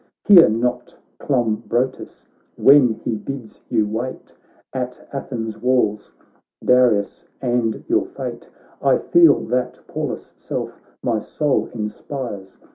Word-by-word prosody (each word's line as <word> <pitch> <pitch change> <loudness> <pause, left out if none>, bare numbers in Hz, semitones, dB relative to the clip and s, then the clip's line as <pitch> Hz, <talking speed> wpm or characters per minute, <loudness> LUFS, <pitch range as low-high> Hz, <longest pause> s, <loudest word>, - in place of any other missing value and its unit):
Hear 185 -5 +8
not 125 +3 -2 0.2
Clombrotus 120 -1 -1 0.3
ivhen 135 -5 +6
he - - -1
bids 120 -1 -8
you 110 - +2
wait, 115 +5 -5 0.4
At 125 -1 -5
Athens' 115 -5 -5
walls, 115 -4 +1 0.5
Darius 120 -5 +3 0.2
and 120 -3 -1
your 350 +2 +1
fate; - - -7 0.3
I - - +4
feel 340 -1 +5
that 125 +1 -1
Pallas' - - -5
self - - -5 0.2
my 115 -3 +1
soul 145 +6 -1
inspires. 105 -2 -6
125 Hz, 110 wpm, -21 LUFS, 110-130 Hz, 0.5 s, Hear